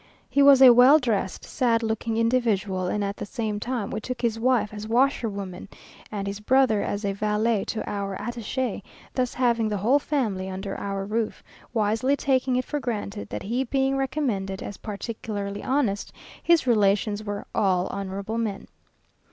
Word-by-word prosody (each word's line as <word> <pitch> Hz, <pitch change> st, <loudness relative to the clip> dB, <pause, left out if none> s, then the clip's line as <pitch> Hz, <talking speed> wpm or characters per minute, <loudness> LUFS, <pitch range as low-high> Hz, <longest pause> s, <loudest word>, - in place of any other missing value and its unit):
He 280 Hz, -, +2 dB
was 275 Hz, -1 st, +8 dB
a 250 Hz, -2 st, +10 dB
well 250 Hz, +5 st, +8 dB
dressed, 220 Hz, -9 st, -2 dB
sad 230 Hz, -2 st, +1 dB
looking 220 Hz, 0 st, -1 dB
individual; 220 Hz, -6 st, +1 dB
and 205 Hz, +3 st, -1 dB
at 200 Hz, +1 st, -3 dB
the -, -, -5 dB
same 215 Hz, -1 st, -3 dB
time 235 Hz, -2 st, -3 dB
we 215 Hz, -, -3 dB
took 255 Hz, +3 st, -5 dB
his 230 Hz, -2 st, 0 dB
wife 230 Hz, -4 st, +1 dB
as 210 Hz, 0 st, -6 dB
washerwoman, 215 Hz, -7 st, 0 dB, 0.4 s
and 200 Hz, -2 st, -3 dB
his 200 Hz, +1 st, -4 dB
brother 235 Hz, -1 st, +3 dB
as 205 Hz, +1 st, -3 dB
valet 210 Hz, +2 st, 0 dB
to 220 Hz, -, -4 dB
our 200 Hz, -2 st, -3 dB
attache, 240 Hz, +1 st, -3 dB, 0.3 s
thus 250 Hz, -2 st, -1 dB
having 235 Hz, -3 st, +2 dB
the 210 Hz, -, -1 dB
whole 240 Hz, +9 st, +3 dB
family 220 Hz, -11 st, -1 dB
under 190 Hz, +1 st, -5 dB
our 195 Hz, -1 st, -3 dB
roof, 215 Hz, +2 st, -2 dB, 0.3 s
wisely 225 Hz, +4 st, +1 dB
taking 260 Hz, -2 st, +1 dB
it 255 Hz, -, 0 dB
for 295 Hz, -, -3 dB
granted 210 Hz, -5 st, -4 dB
that -, -, -5 dB
he 240 Hz, +5 st, -1 dB
being 270 Hz, +1 st, 0 dB
recommended 250 Hz, -9 st, -2 dB
as 205 Hz, -, -7 dB
particularly 205 Hz, -1 st, -5 dB
honest, 255 Hz, -7 st, 0 dB, 0.3 s
his 340 Hz, -5 st, +3 dB
relations 210 Hz, -2 st, +2 dB
were 205 Hz, -1 st, -5 dB
"all 185 Hz, -3 st, +2 dB
honourable 200 Hz, +3 st, -4 dB
men." 210 Hz, -4 st, -3 dB
220 Hz, 165 wpm, -25 LUFS, 200-250 Hz, 0.4 s, a